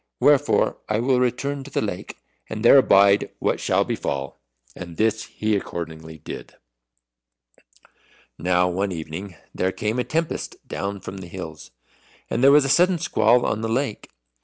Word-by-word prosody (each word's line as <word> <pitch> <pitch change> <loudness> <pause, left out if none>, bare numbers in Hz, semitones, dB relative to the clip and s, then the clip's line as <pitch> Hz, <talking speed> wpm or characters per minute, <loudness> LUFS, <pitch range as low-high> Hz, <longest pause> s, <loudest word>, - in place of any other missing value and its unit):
Wherefore 145 0 +3
I 105 0 +1
will 125 +1 +2
return 135 +3 -1
to 140 - -11
the - - -1
lake, 100 -4 -5 0.3
and 110 +1 -4
there 135 - +9
abide 100 -4 +4
what - - 0
shall - - +2
befall." 70 -1 -4 0.3
And 85 -2 -9
this 110 0 +1
he 110 0 -1
accordingly 80 -4 -6
did. 75 - -9 1.8
Now 90 0 +2
one 95 +2 -1
evening 85 +3 -6 0.2
there 95 - 0
came 110 +4 -2
a - - +1
tempest 165 +3 -2
down 100 0 -4
from 95 - -8
the 95 -2 -8
hills, 85 -3 -8 0.6
and 120 - 0
there 135 - +8
was 145 -1 +6
a - - 0
sudden 180 +5 +4
squall 120 -4 +3
on 110 - -1
the 115 - -2
lake. 125 -1 -2
105 Hz, 160 wpm, -23 LUFS, 90-125 Hz, 1.8 s, there